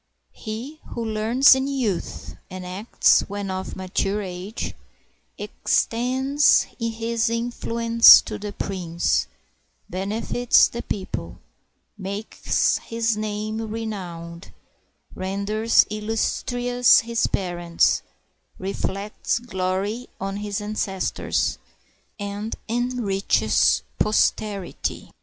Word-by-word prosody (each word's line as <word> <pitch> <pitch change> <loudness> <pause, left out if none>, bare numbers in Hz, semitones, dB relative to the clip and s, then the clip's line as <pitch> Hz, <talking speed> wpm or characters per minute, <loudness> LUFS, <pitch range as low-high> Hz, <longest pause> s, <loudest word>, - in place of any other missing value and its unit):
He 240 +8 -7 0.2
who 235 - -3
learns 225 +5 +5
in 265 +1 0
youth, 250 -10 -3
and 185 0 -7
acts 190 +5 +3
when 200 -1 -4
of 185 0 -5
mature 195 +2 -1
age. 185 +3 -5 0.6
Extends 265 +5 +2 0.2
his 230 0 -1
influence 230 0 +6
to - - -6
the 205 0 -5
prince, 170 - -1 0.6
benefits 215 +6 +2
the 235 - -6
people. 190 -2 -5 0.6
Makes 200 +3 0
his 230 -1 -1
name 215 +1 -3
renowned, 185 -6 -6 0.6
renders 200 +4 +2
illustrious 245 +3 +2
his 230 0 0
parents, 175 -3 +1 0.6
Reflects 195 +3 -2
glory 205 +1 -2
on 195 +1 -3
his 205 0 -3
ancestors, 205 -2 -1 0.6
and 205 +1 -4
enriches 235 -4 +1 0.2
posterity. 210 -2 0
215 Hz, 85 wpm, -23 LUFS, 195-230 Hz, 0.6 s, influence